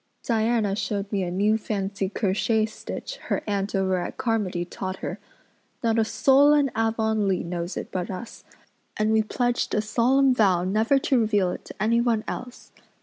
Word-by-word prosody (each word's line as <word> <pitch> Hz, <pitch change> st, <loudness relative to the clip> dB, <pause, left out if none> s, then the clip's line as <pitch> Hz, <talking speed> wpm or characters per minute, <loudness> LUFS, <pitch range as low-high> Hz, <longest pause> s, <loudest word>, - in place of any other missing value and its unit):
Diana 225 Hz, -3 st, +1 dB
showed 200 Hz, -1 st, -3 dB
me 200 Hz, -2 st, 0 dB
a 180 Hz, -, -2 dB
new 205 Hz, +5 st, +1 dB
fancy 195 Hz, -2 st, -2 dB
crochet 215 Hz, +2 st, +1 dB
stitch 220 Hz, -, -7 dB
her -, -, -1 dB
aunt 200 Hz, -1 st, -2 dB
over 190 Hz, -1 st, +1 dB
at -, -, -5 dB
Carmody 205 Hz, -7 st, -1 dB
taught 185 Hz, +1 st, -5 dB
her. -, -, -6 dB, 0.6 s
Not 230 Hz, -1 st, +2 dB
a -, -, +4 dB
soul 275 Hz, +6 st, +4 dB
in 285 Hz, -3 st, +2 dB
Avonlea 220 Hz, -4 st, +1 dB
knows 170 Hz, +1 st, -4 dB
it -, -, -6 dB
but 180 Hz, -1 st, -3 dB
us, 195 Hz, +5 st, -7 dB, 0.5 s
and 215 Hz, +1 st, +1 dB
we 220 Hz, 0 st, +4 dB
pledged 245 Hz, +3 st, -1 dB
a 210 Hz, -, +2 dB
solemn 255 Hz, +5 st, +3 dB
vow 190 Hz, -7 st, +3 dB
never 215 Hz, +8 st, +2 dB
to 265 Hz, -1 st, +2 dB
reveal 205 Hz, -5 st, +2 dB
it -, -, -7 dB
to -, -, -10 dB
anyone 230 Hz, +1 st, +2 dB
else. 250 Hz, 0 st, -7 dB
215 Hz, 170 wpm, -25 LUFS, 195-230 Hz, 0.6 s, a